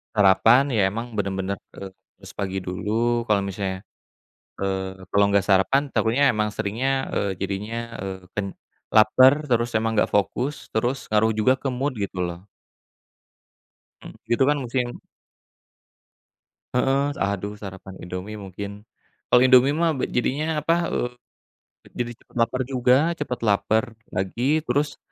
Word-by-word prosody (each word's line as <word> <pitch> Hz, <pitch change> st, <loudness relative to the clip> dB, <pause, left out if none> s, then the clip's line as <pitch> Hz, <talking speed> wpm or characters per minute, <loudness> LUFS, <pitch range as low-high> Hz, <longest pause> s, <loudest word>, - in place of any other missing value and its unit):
sarapan 105 Hz, +7 st, +5 dB
ya 110 Hz, -7 st, +2 dB
emang 115 Hz, 0 st, -5 dB
bener-bener, 95 Hz, -1 st, -2 dB, 0.2 s
eee, 95 Hz, -1 st, -8 dB, 0.3 s
harus -, -, -11 dB
pagi 95 Hz, -1 st, -2 dB
dulu 115 Hz, +6 st, -1 dB
kalau 105 Hz, -3 st, +2 dB
misalnya 95 Hz, -1 st, -4 dB, 0.8 s
eee, 95 Hz, -1 st, -3 dB
kalau 100 Hz, +2 st, +3 dB
enggak 100 Hz, -1 st, +2 dB
sarapan 105 Hz, +9 st, +3 dB
takutnya 125 Hz, +6 st, +3 dB
emang 105 Hz, -4 st, +1 dB
seringnya, 130 Hz, +7 st, -1 dB
eee, 100 Hz, -, 0 dB
jadinya, 110 Hz, +5 st, -4 dB
eee, 95 Hz, -1 st, -7 dB
pen 100 Hz, -2 st, -2 dB, 0.4 s
lapar 130 Hz, +7 st, +5 dB
terus 120 Hz, -2 st, +1 dB
emang 110 Hz, 0 st, -1 dB
gak -, -, +2 dB
fokus, 125 Hz, +8 st, -1 dB
terus 120 Hz, +5 st, -1 dB
ngaruh 110 Hz, +1 st, +3 dB
juga 130 Hz, +4 st, +4 dB
ke 135 Hz, 0 st, -3 dB
mood 130 Hz, +1 st, -2 dB
gitu 100 Hz, -3 st, -4 dB
loh. 85 Hz, 0 st, -3 dB, 1.6 s
Mmm. -, -, -10 dB, 0.2 s
Gitu 120 Hz, -, +4 dB
kan 150 Hz, -, +2 dB
musim 125 Hz, +1 st, -1 dB, 1.9 s
Heeh, 135 Hz, +3 st, +1 dB
aduh 100 Hz, +1 st, -1 dB
sarapan 95 Hz, -1 st, -9 dB
Indomie 90 Hz, +4 st, -6 dB
mungkin. 100 Hz, 0 st, -7 dB, 0.5 s
Kalau 125 Hz, -, +6 dB
Indomie 130 Hz, +2 st, +6 dB
mah 165 Hz, -1 st, +2 dB
be 135 Hz, -, -3 dB
jadinya 150 Hz, +6 st, -1 dB
apa, 155 Hz, +3 st, +1 dB, 0.2 s
eee, 125 Hz, -, -1 dB, 0.8 s
jadi 120 Hz, -1 st, -3 dB
cepet -, -, -27 dB
laper 115 Hz, +3 st, +1 dB
juga 125 Hz, -1 st, +3 dB, 0.2 s
cepet 140 Hz, -7 st, -4 dB
lapar 110 Hz, +3 st, +2 dB, 0.2 s
lagi. 95 Hz, +5 st, -3 dB, 0.2 s
Terus 145 Hz, +1 st, 0 dB
110 Hz, 135 wpm, -24 LUFS, 100-130 Hz, 1.9 s, Kalau